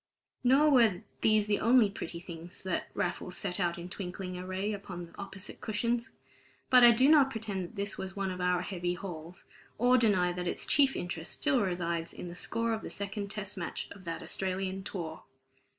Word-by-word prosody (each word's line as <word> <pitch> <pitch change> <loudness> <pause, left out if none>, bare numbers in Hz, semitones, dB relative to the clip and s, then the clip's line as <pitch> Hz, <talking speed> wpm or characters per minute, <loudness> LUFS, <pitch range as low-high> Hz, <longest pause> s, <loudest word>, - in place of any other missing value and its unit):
Nor 275 +5 +5
were 230 -9 +4 0.2
these 215 -1 +4
the 210 -1 +1
only 235 -1 +5
pretty 170 -3 -5
things 170 0 -9
that 190 -1 -2
Raffles 180 0 -2
set 185 -2 -2
out 175 -3 0
in 170 +1 -6
twinkling 185 0 -5
array 185 +3 -3
upon 185 -3 -6
the 170 - -17
opposite 195 0 -8
cushions. 235 +3 -1 0.6
But 250 -1 +8
I 240 - +11
do 245 +3 +5
not 290 -3 +6
pretend 215 -6 -3
that 180 +6 -9
this 200 0 -3
was 190 0 -5
one 195 -1 -1
of 180 0 -5
our 180 0 +2
heavy 175 -2 -2
hauls, 175 -2 -8 0.3
or 250 +2 +5
deny 185 -6 +3
that 180 0 -3
its - - 0
chief 275 -2 +4
interest 175 -2 -4
still 275 -5 +2
resides 170 -3 -2
in 175 - -7
the - - -7
score 230 +5 0
of 220 - -2
the - - -6
Second 200 0 -4
Test 205 -1 -5
Match 170 - -4
of 200 - -11
that 165 -1 -4
Australian 190 0 -2
tour. 170 -5 -5
195 Hz, 195 wpm, -31 LUFS, 180-220 Hz, 0.6 s, I